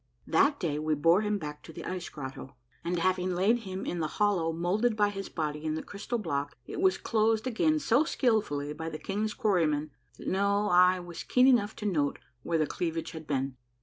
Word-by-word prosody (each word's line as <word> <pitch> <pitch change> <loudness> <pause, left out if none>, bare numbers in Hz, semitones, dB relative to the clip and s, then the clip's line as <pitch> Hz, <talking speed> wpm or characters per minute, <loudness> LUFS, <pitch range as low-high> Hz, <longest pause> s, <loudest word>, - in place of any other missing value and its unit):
That 285 0 +3
day 150 -6 -1
we 155 0 0
bore 165 +7 +4
him 210 -1 0
back 150 -4 -7
to - - -11
the - - -8
ice 180 -1 -4
grotto, 135 -2 -8 0.3
and 175 +1 -1
having 185 +1 +1
laid 205 +7 +3
him 190 -4 -6
in 175 - -3
the 155 - 0
hollow 195 -6 +2
moulded 195 +8 +1
by 205 -1 +4
his 195 -1 -6
body 150 -2 -3
in 155 -1 -1
the 160 - -4
crystal 205 +4 -4
block, 145 -8 -3
it - - -5
was 380 -1 +4
closed 220 0 +1
again 285 +6 +2
so 280 -1 +3
skilfully 210 - 0
by 160 +2 -5
the 155 - -5
king's 210 +5 -2
quarrymen 160 - +1 0.3
that - - -9
no 200 +2 +1
eye 180 0 +5
was 175 -1 -7
keen 250 0 +3
enough 235 -5 +4
to 210 - -7
note 150 -8 +1 0.2
where 165 +4 0
the 155 - +2
cleavage 165 +1 -3
had 160 -1 -9
been. 135 -2 -2
180 Hz, 210 wpm, -29 LUFS, 155-210 Hz, 0.3 s, eye